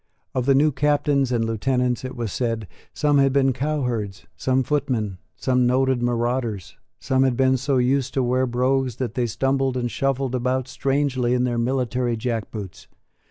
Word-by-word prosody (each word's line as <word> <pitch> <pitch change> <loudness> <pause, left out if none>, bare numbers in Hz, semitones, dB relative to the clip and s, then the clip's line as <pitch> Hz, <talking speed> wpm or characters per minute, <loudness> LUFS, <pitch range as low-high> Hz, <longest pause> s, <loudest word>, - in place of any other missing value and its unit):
Of 130 0 -1
the 135 - +5
new 150 +3 +4
Captains 145 -1 +1
and 115 -2 +1
Lieutenants, 125 +2 0
it 130 0 -6
was 115 -5 -4
said, 115 -4 -2 0.2
some 145 -1 +2
had 135 -1 +4
been 135 -1 +3
cow 145 +3 -1
herds, 110 -5 -3
some 130 0 +1
footmen, 125 -9 -1 0.2
some 125 -1 +1
noted 130 0 +2
marauders; 120 -4 -1 0.2
some 130 0 +1
had 130 -3 +2
been 130 0 +3
so 135 +1 0
used 130 +1 +1
to 135 - +2
wear 130 +1 +1
brogues 130 0 0
that 120 -3 -3
they 125 -2 0
stumbled 135 +3 0
and 120 -1 -2
shuffled 135 -1 -1
about 130 +1 0
strangely 135 -2 0
in 125 - +1
their 120 -2 0
military 125 -1 0
jack 115 -1 -2
boots. 100 -5 -8
125 Hz, 175 wpm, -23 LUFS, 120-135 Hz, 0.2 s, the